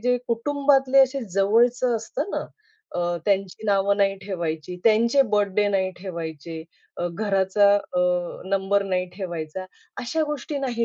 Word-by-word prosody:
जे 250 +2 +2
कुटुंबातले 275 +2 +2
असे 270 +1 +4
जवळचं 235 +4 +3
असतं 260 - -4
ना - - -3 0.5
अ, - - -2 0.3
त्यांची 195 +1 -1
नावं 200 0 +2
नाही 195 -1 +2
ठेवायची. 175 -3 -4
त्यांचे 230 +5 +5
बर्थडे 205 0 +2
नाही 190 -2 +1
ठेवायचे. 165 -3 -6 0.3
अ, 175 - -2
घराचा 200 0 +2
अ, 180 -3 -2 0.5
नंबर 195 +1 +1
नाही 185 -1 -1
ठेवायचा, 175 -2 -5 0.4
अशा 315 +7 -1
गोष्टी 295 0 -4
नाही 245 -4 -1
200 Hz, 135 wpm, -24 LUFS, 190-245 Hz, 0.5 s, त्यांचे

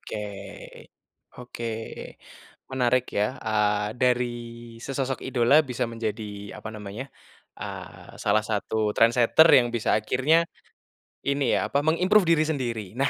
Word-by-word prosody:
Oke 105 -1 -6 1.1
oke, 120 -1 -6 1.0
menarik 125 -1 +2
ya. 105 +6 0
Eee, 105 -1 0
dari 125 -1 +1 0.5
sesosok 135 0 -3
idola 130 +4 +4
bisa 125 -2 -3
menjadi 110 -3 -5
apa 110 - -7
namanya, 105 +5 -7 0.5
eee, - - -9
salah 110 +1 +2
satu 110 0 -1
trendsetter 120 +7 +5
yang 120 -2 +5
bisa 120 -2 0
akhirnya 135 +10 +2 0.8
ini 140 -3 +1
ya - - -1
apa, 140 - +1
meng-improve 180 +5 +4
diri 160 - +3
sendiri. 120 -8 -3
Nah, 135 0 +2
120 Hz, 120 wpm, -25 LUFS, 110-135 Hz, 1.1 s, trendsetter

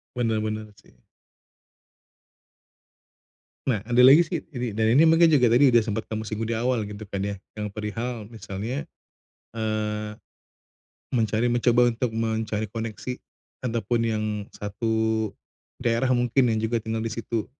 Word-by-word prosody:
Benar, 115 -3 0
benar 110 0 -4
sih. - - -23 2.7
Nah, 110 -6 +1
ada 120 +3 -3
lagi 140 +6 +9
sih 170 0 -1 0.2
ini, 120 -5 -4
dan 110 0 +3
ini 160 +5 +6
mungkin 165 +1 +6
juga 145 -7 +5
tadi 125 +2 +5
udah 120 - +6
sempet 110 0 -3
kamu 110 0 -4
singgung 110 0 -4
di 115 - -1
awal, 115 -1 0
gitu 105 +1 -8
kan 100 - -3
ya, 100 - -2 0.2
yang 105 - -3
perihal 110 +1 -4
misalnya, 115 +5 -5 0.7
eee, 110 -1 -2 1.1
mencari 110 0 +1
mencoba 120 0 +3
untuk 120 +1 -1
mencari 110 -1 -1
koneksi, 115 +2 -4 0.5
ataupun 115 -1 0
yang 110 -2 0 0.3
satu 110 +1 -1 0.5
daerah 120 +2 +1
mungkin 125 0 +3
yang 110 - +1
juga 110 +1 -1
tinggal 110 +1 -3
di 110 0 -3
situ. 115 -1 -3
115 Hz, 140 wpm, -25 LUFS, 110-120 Hz, 2.7 s, lagi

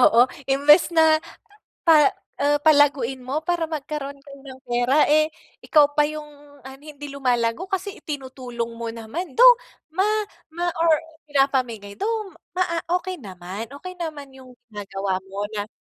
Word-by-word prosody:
oo. 235 -2 +6 0.3
Imbes 285 +4 +5
na 315 -1 +5 0.6
pa 310 -4 +7 0.3
uh, 290 +1 +3
palaguin 285 -4 +4
mo 275 +4 -2
para 345 0 0
magkaroon 295 -2 -5
kayo 280 0 -13
ng 260 -1 -11
pera, 245 +5 +3
eh, 310 +1 +4 0.4
ikaw 295 -2 +4
pa 295 - +5
yung 305 -1 -7 0.4
ano, 265 +1 -11
hindi 295 -1 -10
lumalago 250 +3 0
kasi 385 +1 -3
itinutulong 255 -5 -5
mo 230 0 -5
naman. 245 +9 -6
Though - - +9 0.4
ma 375 +4 +1 0.5
ma 350 +1 -1
or 335 -1 +4 0.4
pinapamigay. 255 -7 0
Though 435 -3 -2 0.2
maa 345 -2 0 0.2
okey 370 0 -6
naman. 190 +1 -7
Okey 365 +5 -8
naman 300 -4 -6
yung 255 -1 -14 0.2
ginagawa 195 -2 -3
mo 200 +1 -4
na 205 -1 -3
280 Hz, 145 wpm, -23 LUFS, 245-315 Hz, 0.6 s, Though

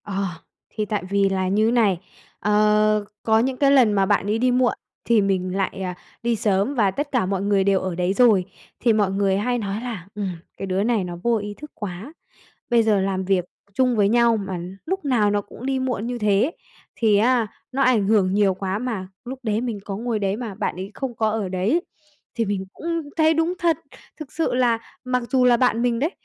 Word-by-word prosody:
Ờ, 200 -1 -2 0.5
thì 215 -1 -3
tại 210 -1 -2
vì 200 0 +2
là 190 -1 0
như 215 +4 +2
này, 215 -7 +3 0.4
ờ, 210 0 +3 0.2
có 220 0 +3
những 255 +2 0
cái 275 0 +4
lần 250 -6 +5
mà 195 -1 +3
bạn 200 -1 +1
ấy 210 +2 +1
đi 250 +1 +3
muộn 250 0 +3 0.3
thì 230 -2 +4
mình 185 -2 0
lại, 195 0 -2
ờ, 180 -1 -3 0.3
đi 235 0 +1
sớm 205 +5 0
và 205 -6 +3
tất 290 +8 -4
cả 250 -8 +1
mọi 190 0 -1
người 200 -1 +2
đều 195 -1 +3
ở 185 -2 -3
đấy 180 +2 0
rồi. 210 -5 +4 0.3
Thì 235 - +3
mọi 205 -3 +2
người 195 0 +1
hay 245 +4 0
nói 205 -1 -3
là, 225 -8 -6
ừm, 205 -2 -2 0.3
"Cái - - -4
đứa 190 +1 0
này 225 -3 +1
nó 175 -1 -5
vô 235 -1 +2
ý 205 0 -5
thức 300 +7 -11
quá. 205 - -7 0.6
Bây 235 -1 +5
giờ 215 -3 +2
làm 190 0 -1
việc 185 -2 +1 0.3
chung 250 0 +2
với 205 -2 +4
nhau 235 +1 +4
mà 195 -3 -4 0.3
lúc 380 0 -2
nào 235 -7 +2
nó 205 0 +1
cũng 235 +5 -10
đi 270 -1 0
muộn 250 -4 -2
như 245 0 -3
thế, 210 +5 +2 0.5
thì 220 -3 +3
á, 235 +2 +3 0.3
nó 275 +1 +1
ảnh 240 -6 +3
hưởng 195 -4 +3
nhiều 200 -2 +3
quá 190 +1 -3
mà." 220 -6 -4 0.2
Lúc 255 +2 -6
đấy 215 -2 0
mình 235 -4 -3
có 195 - -4
ngồi 230 +1 -2
đấy 200 -1 -1
mà 225 -4 -5
bạn 205 -2 -3
ấy 190 +2 -6
không 265 -3 -4
có 220 -1 +1
ở 215 -3 -2
đấy 195 - 0 0.5
thì 230 - 0
mình 195 -2 -2
cũng 335 -2 -4
thấy 320 -1 +4
đúng 325 +3 +1
thật. 340 -2 +2 0.4
Thực 295 -3 -8
sự 325 - -1
là 245 -2 +2 0.3
mặc 250 0 0
dù 260 -2 +3
là 245 -1 +6
bạn 235 -1 +2
mình 240 -1 +1
đấy, 300 +7 0
215 Hz, 225 wpm, -23 LUFS, 195-245 Hz, 0.6 s, là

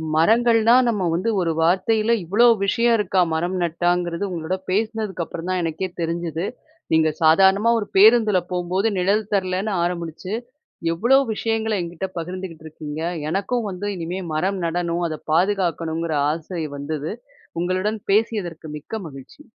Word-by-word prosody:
மரங்கள்னா 230 +6 +4
நம்ம 205 -5 -1
வந்து 200 +7 0
ஒரு 165 -1 0
வார்த்தையில 215 +6 +2
இவ்ளோ 220 +8 +4 0.2
விஷயம் 235 +3 +3
இருக்கா? 195 -2 0
மரம் 175 +3 -1
நட்டாங்கிறது 175 +2 0
உங்களோட 170 +2 -2
பேசுனதுக்கு 210 -3 -1
அப்புறம் 170 +2 -7
தான் 185 -1 0
எனக்கே 165 +3 -2
தெரிஞ்சுது. 170 +1 -2 0.5
நீங்க 160 0 +4
சாதாரணமா 190 +7 +5
ஒரு 205 - -4
பேருந்துல 215 -1 +6
போம்போது 180 +4 0
நிழல் 200 +3 +1
தரலன்னு 190 +2 0
ஆரம்பிச்சு, 175 +2 -4 0.6
எவ்ளோ 240 +11 +4 0.2
விஷயங்கள 225 0 -1
என்கிட்ட 175 +2 -4
பகிர்ந்துக்கிட்டு 175 -1 -6
இருக்கீங்க. 155 0 -7 0.3
எனக்கும் 210 +5 -1
வந்து 190 +2 -5
இனிமே 175 +3 -4
மரம் 190 +4 0
நடணும் 170 0 -1
அத 155 -1 -5
பாதுகாக்கணுங்கிற 170 -3 0 0.2
ஆசை 165 +1 -5
வந்தது. 150 +3 -4 0.5
உங்களுடன் 185 +5 -1
பேசியதற்கு 195 -7 0
மிக்க 220 +9 -6
மகிழ்ச்சி. 135 - -13
185 Hz, 130 wpm, -22 LUFS, 165-210 Hz, 0.6 s, பேருந்துல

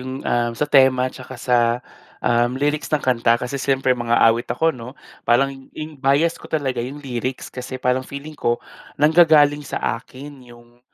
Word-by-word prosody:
yung, 130 +1 -7
um, 120 0 0
sa 150 - 0
tema 130 -3 +3
tsaka 130 0 -10
sa, 125 0 +1 0.7
um, 120 +1 +2
lyrics 145 +2 -1
ng 150 -2 -1
kanta 115 -2 +3
kasi 130 +3 -5
siyempre 135 -1 +1
mang-aawit 120 -1 +2
ako 160 +7 +1
'no. 125 +3 -10 0.3
Parang 135 +3 +3 0.2
yung 155 -2 -8
bias 140 +5 +2
ko - - -12
talaga, 135 -6 -1
yung 130 +5 -6
lyrics 125 0 -4
kasi 130 0 -6
parang 125 0 0
feeling 145 +2 -8
ko 120 -4 0 0.4
nanggagaling 150 -2 +5
sa 140 - -5 0.2
akin 140 +3 -12
yung 120 0 -18
130 Hz, 165 wpm, -21 LUFS, 120-145 Hz, 0.7 s, nanggagaling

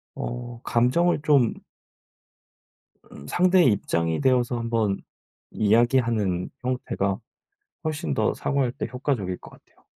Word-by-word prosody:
어 120 0 -6
감정을 145 +9 +2
좀 140 -6 +4 1.6
음 70 - -11
상대의 180 - +4
입장이 85 -5 -1
되어서 125 -2 +2
한번 115 -4 0 0.5
이야기하는 110 -4 +2
형태가 115 -6 -2 0.7
훨씬 155 +2 -2
더 - - +1
사과할 135 -4 0
때 - - -4
효과적일 125 -8 -2
것 - - -13
같아요. - - -22
120 Hz, 240 characters per minute, -25 LUFS, 105-135 Hz, 1.6 s, 좀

